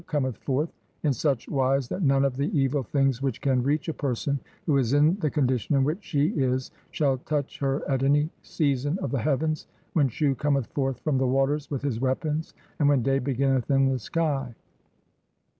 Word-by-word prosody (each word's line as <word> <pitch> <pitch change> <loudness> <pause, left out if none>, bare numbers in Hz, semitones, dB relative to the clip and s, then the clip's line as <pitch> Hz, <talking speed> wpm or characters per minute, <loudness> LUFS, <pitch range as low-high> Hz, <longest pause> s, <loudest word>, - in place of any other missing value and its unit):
"cometh 130 -5 -1
forth, 145 +4 -1 0.3
in 145 -3 +3
such 135 0 -1
wise 135 -1 +1
that 185 - -4
none 135 -3 +3
of 135 -2 0
the 140 +8 -1
evil 135 +1 +1
"things 135 0 0
which 135 -4 -1
can 130 -2 +1
reach 145 +6 0
a 160 - -1
person 140 0 -1 0.3
who 150 - +2
is 130 -1 +1
in 150 +4 +4
the 155 - +1
con 145 -1 +1
dition 125 +2 0
in 135 - +3
which 155 +9 -1
she 145 -2 +1
is 130 - -1 0.2
shall 135 -4 +1
touch 145 +1 -3
her 135 0 -1
at 135 -2 0
any 145 +2 +3
season 145 +1 0
of 135 - -2
"the 135 - 0
heavens, 155 +4 0 0.3
when 145 -5 +3
Shu 140 +3 +1
cometh 140 -1 0
forth 135 -3 -1
from 140 -1 +1
the 130 - +2
waters 135 +3 +1
"with 140 -2 -3
his 130 -6 -1
weapons 150 +4 -1 0.2
and 145 -2 +4
when 140 -4 +3
day 135 +2 +2
beginneth 135 -1 0
in 135 -1 +4
the 130 -1 0
sky. 135 -2 -2
140 Hz, 200 wpm, -26 LUFS, 130-150 Hz, 0.3 s, in